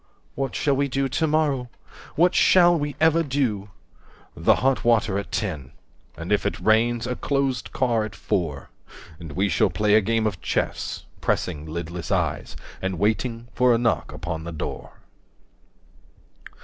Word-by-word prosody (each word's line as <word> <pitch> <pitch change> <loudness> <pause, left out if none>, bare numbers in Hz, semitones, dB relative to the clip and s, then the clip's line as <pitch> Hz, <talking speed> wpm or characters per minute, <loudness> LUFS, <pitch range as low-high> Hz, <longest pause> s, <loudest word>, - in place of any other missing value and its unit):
What 135 -2 -3
shall 140 -2 +1
we 140 +1 +1
do 135 +1 0
to 145 +5 0
morrow? 145 -5 +1 0.5
What 175 +3 +4
shall 175 -1 +5
we 145 -3 -2
ever 160 +1 +4
do?" 125 -9 -1 0.7
The - - +3
hot 135 +1 +1
water 110 -4 +2
at 100 - -7
ten. 75 - -3 0.4
135 - - -9
And - - -6
if - - +2
it - - -2
rains, 115 +2 +2
a 125 0 -2
closed 135 -2 -1
car 120 -4 +1
at 110 -2 -6
four. 80 -9 -3 0.5
And 80 -4 -8
we 95 +5 +1
shall 95 +2 +2
play 105 +4 +1
a 110 - +6
game 115 +2 0
of 100 -5 -2
chess, - - -2 0.2
Pressing 75 +1 -1
lidless 85 +1 -5
eyes - - -1 0.3
and 95 -1 -2
waiting 115 +4 -1
for 125 -1 +4
a - - +2
knock 120 -1 0
upon 80 -1 -5
the 85 - -6
door. 80 - -6
115 Hz, 160 wpm, -24 LUFS, 95-135 Hz, 0.7 s, a